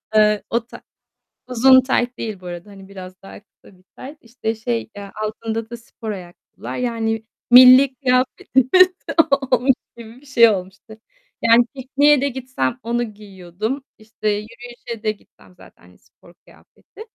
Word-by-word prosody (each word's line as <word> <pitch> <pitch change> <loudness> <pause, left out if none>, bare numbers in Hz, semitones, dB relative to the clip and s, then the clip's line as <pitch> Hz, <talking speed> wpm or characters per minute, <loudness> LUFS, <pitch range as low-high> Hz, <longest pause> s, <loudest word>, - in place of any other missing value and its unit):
Iıı, 210 -1 +3
o 235 0 -1
ta - - -13 0.7
uzun 260 +1 +5
tayt 250 -1 -1
değil 215 -4 -6
bu 180 - -16
arada, 175 +3 -8
hani, 195 -1 -14
biraz 185 -1 -11
daha 195 - -12
kısa 205 -1 -23
bir 185 - -28
tayt. 285 +4 -11
İşte, 230 -1 -5
şey, 230 +1 -4
eee, 200 -1 -9
altında 225 +1 -5
da 235 - -7
spor 230 -1 -9
ayakkabılar, 180 -3 -10
yani, 225 -2 -2 0.3
milli 255 +2 +8
kıyafetimiz 260 +5 +2 0.6
olmuş 255 +2 +3 0.2
gibi 235 +2 -13
bir - - -21
şey 235 -4 +5
olmuştu. 200 +2 -6 0.4
Yani 230 +1 +5
pikniğe 275 +2 +2
de 280 - 0
gitsem 260 -1 -4
onu 240 +1 -1
giyiyordum. 210 +3 -7 0.2
İşte, 215 0 -5
yürüyüşe 230 +2 -7
de 215 - +1
gitsem 200 -3 -19
zaten 90 - -19
spor 90 - -23
kıyafeti. 420 - -19
230 Hz, 145 wpm, -20 LUFS, 210-255 Hz, 0.7 s, milli